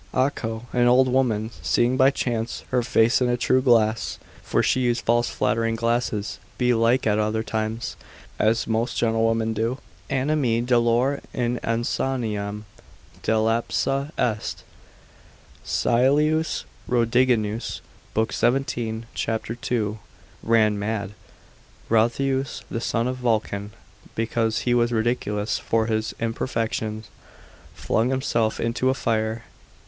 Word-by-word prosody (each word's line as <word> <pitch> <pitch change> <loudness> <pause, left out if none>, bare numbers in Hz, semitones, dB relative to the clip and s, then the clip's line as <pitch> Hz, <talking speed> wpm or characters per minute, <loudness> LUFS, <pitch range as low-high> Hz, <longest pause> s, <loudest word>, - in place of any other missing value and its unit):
Acco, 120 -4 -1
an 120 -1 +3
old 130 +2 +5
woman, 120 -4 +1
seeing 120 +2 +2
by 130 0 +5
chance 120 -4 -2
her 125 -1 +2
face 115 +1 +3
in 125 - +2
a 120 - +1
true 130 +2 +2
glass 115 -3 +2 0.2
(for - - 0
she - - +2
used 120 -1 0
false 120 +1 +2
flattering 115 0 0
glasses 115 -2 -1 0.2
belike 125 0 +2
at 105 -1 +2
other 110 +1 0
times, 110 +1 -3 0.4
as 110 +2 +2
most 115 +2 -1
gentlewomen 115 0 +1
do,) 115 +4 -1 0.3
animi 135 -3 +1
dolore 120 +3 +2
in 120 0 0
insaniam 115 -3 -2 0.6
delapsa 115 +5 0
est, 110 -3 -1 1.0
(Caelius 150 +6 +2 0.3
Rhodiginus 115 -2 +1 0.4
l. 110 - +4
17, 120 -4 -1
c. 115 0 -1 0.2
2,) 110 -3 -1 0.4
ran 110 -2 +3
mad. 105 0 -3 0.7
Brotheus, 130 +4 +1
the 115 - -2
son 115 0 0
of 130 0 -2
Vulcan, 110 -4 -1 0.5
because 115 0 0
he 120 - +1
was 120 0 +2
ridiculous 110 -2 0
for 115 -1 +1
his 110 0 -1
imperfections, 115 -2 -2 0.7
flung 115 +3 0
himself 120 -4 0
into 115 +2 0
the 130 - +3
fire. 110 -1 -1
115 Hz, 115 wpm, -24 LUFS, 110-125 Hz, 1.0 s, old